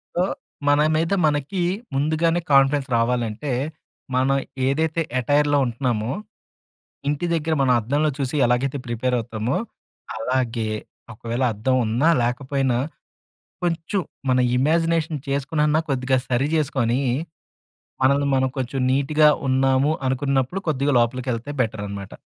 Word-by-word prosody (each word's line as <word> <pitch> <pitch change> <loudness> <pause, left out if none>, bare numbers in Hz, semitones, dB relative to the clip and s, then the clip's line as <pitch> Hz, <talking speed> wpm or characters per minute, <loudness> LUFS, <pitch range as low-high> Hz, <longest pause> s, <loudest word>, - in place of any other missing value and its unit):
So, 175 - +2 0.4
మన 145 +1 +4
మీద 165 +4 +1
మనకి 150 +5 0 0.3
ముందుగానే 160 +4 +1
కాన్ఫిడెన్స్ 135 +1 +4
రావాలంటే, 120 +2 -1 0.6
మనం 135 +2 +2 0.3
ఏదైతే 160 +4 0 0.2
యటైర్‌లో 145 +3 +2
ఉంటన్నామో, 120 -1 -1 1.0
ఇంటి 150 +3 -1
దగ్గర 160 0 0
మనం 130 -2 +4
అద్దంలో 145 +7 +1
చూసి 135 +1 -2
ఎలాగైతే 130 +3 0
ప్రిపేర్ 125 +2 -1
అవుతామో 115 +2 -3 0.6
అలాగే, 115 -1 -1 0.5
ఒకవేళ 115 +4 -3
అద్దం 130 +5 0
ఉన్నా, 125 +9 +2
లేకపోయినా 130 0 0 0.9
కొంచెం 170 +4 -1 0.3
మన 125 - +3 0.2
ఇమాజినేషన్ 165 +1 +1
చేసుకునన్నా 150 +3 +1
కొద్దిగా 130 0 +1
సరి 130 +3 +1
చేసుకొనీ, 130 -5 +1 1.0
మనల్ని 140 +2 +3
మనం 130 0 +2
కొంచెం 130 +1 -3
నీట్‌గా 150 +3 +4 0.2
ఉన్నాము, 135 +2 +3 0.2
అనుకున్నప్పుడు 135 +5 0
కొద్దిగా 140 -1 +1
లోపలికెళ్తే 125 +2 -1
బెటరనమాట. 100 -3 -4
135 Hz, 110 wpm, -22 LUFS, 125-150 Hz, 1.0 s, మన